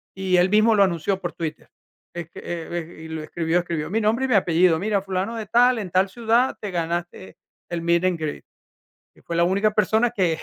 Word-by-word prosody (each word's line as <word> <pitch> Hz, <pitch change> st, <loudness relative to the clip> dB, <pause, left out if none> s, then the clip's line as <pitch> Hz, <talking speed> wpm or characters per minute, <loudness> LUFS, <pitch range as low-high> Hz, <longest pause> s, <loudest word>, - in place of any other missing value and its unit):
y 190 Hz, -1 st, +1 dB
él 180 Hz, +1 st, +4 dB
mismo 215 Hz, +2 st, +4 dB
lo 200 Hz, -, +5 dB
anunció 185 Hz, +1 st, 0 dB
por 175 Hz, -3 st, -5 dB
Twitter, 160 Hz, -2 st, -6 dB, 0.4 s
es 170 Hz, -1 st, -6 dB
que -, -, -11 dB
e 170 Hz, 0 st, -5 dB, 0.2 s
e -, -, -10 dB
y -, -, -8 dB
lo 160 Hz, -1 st, -5 dB
escribió 165 Hz, +2 st, 0 dB
escribió 165 Hz, -3 st, -3 dB
mi 220 Hz, +4 st, 0 dB
nombre 225 Hz, +5 st, +1 dB
y -, -, -1 dB
mi 235 Hz, -, +3 dB
apellido. 170 Hz, -2 st, +3 dB
Mira, 205 Hz, 0 st, 0 dB
fulano 195 Hz, +4 st, -3 dB
de 220 Hz, -2 st, -4 dB
tal, 245 Hz, +2 st, +4 dB
en 185 Hz, -4 st, -6 dB
tal 190 Hz, +1 st, +2 dB
ciudad 235 Hz, +3 st, +1 dB
te 205 Hz, -2 st, -5 dB
ganaste 170 Hz, -, -4 dB, 0.3 s
el 170 Hz, -1 st, -3 dB
meet 170 Hz, +1 st, +2 dB
and 180 Hz, -2 st, +1 dB
greet, 155 Hz, -2 st, -5 dB, 0.7 s
y -, -, -22 dB
fui 170 Hz, -, -4 dB
la 170 Hz, -, +4 dB
única 200 Hz, +4 st, +2 dB
persona 220 Hz, +3 st, +2 dB
que 180 Hz, -8 st, 0 dB
185 Hz, 225 wpm, -23 LUFS, 170-215 Hz, 0.7 s, lo